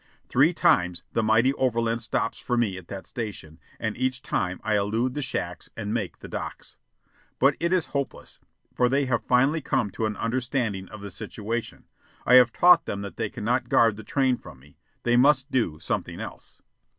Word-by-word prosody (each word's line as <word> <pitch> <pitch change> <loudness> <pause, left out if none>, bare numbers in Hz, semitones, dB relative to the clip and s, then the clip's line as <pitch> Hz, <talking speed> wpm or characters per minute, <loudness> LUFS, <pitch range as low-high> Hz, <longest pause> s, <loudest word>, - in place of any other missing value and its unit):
Three 140 +7 +4
times 90 - +2
the 115 - +2
mighty 115 +4 +3
overland 115 -3 0
stops 115 0 -2
for 125 - -1
me 110 -5 +1
at 95 -2 -10
that 95 -1 -7
station, 100 -9 -7 0.2
and 110 -2 -2
each 130 0 -1
time 90 0 -1
I 110 -1 +1
elude 110 +5 0
the 145 - -3
shacks 130 - -4
and 105 -1 -3
make 105 -8 -3
the - - -10
decks. - - -7 0.6
But 135 +2 +4
it 170 +1 0
is 185 -3 +2
hopeless, 140 -2 -4 0.3
for 125 -1 +2
they 140 +2 +2
have 120 -4 0
finally 135 +7 +3
come 105 -6 0
to 110 +3 -1
an 105 - -4
understanding 115 -5 -2
of 110 -2 -10
the 100 -1 -7
situation. 115 +5 -5 0.4
I 125 - +4
have 125 -2 +8
taught 175 +3 +5
them 100 0 -3
that 100 - -8
they 110 -2 -1
cannot 120 +3 -1
guard 115 -3 +4
the 110 - -9
train 130 +2 +1
from 70 - -12
me. 70 +3 -21 0.2
They 120 0 +3
must 135 +1 +4
do 110 -12 0
something - - -3
else. - - -9
115 Hz, 190 wpm, -26 LUFS, 105-130 Hz, 0.6 s, have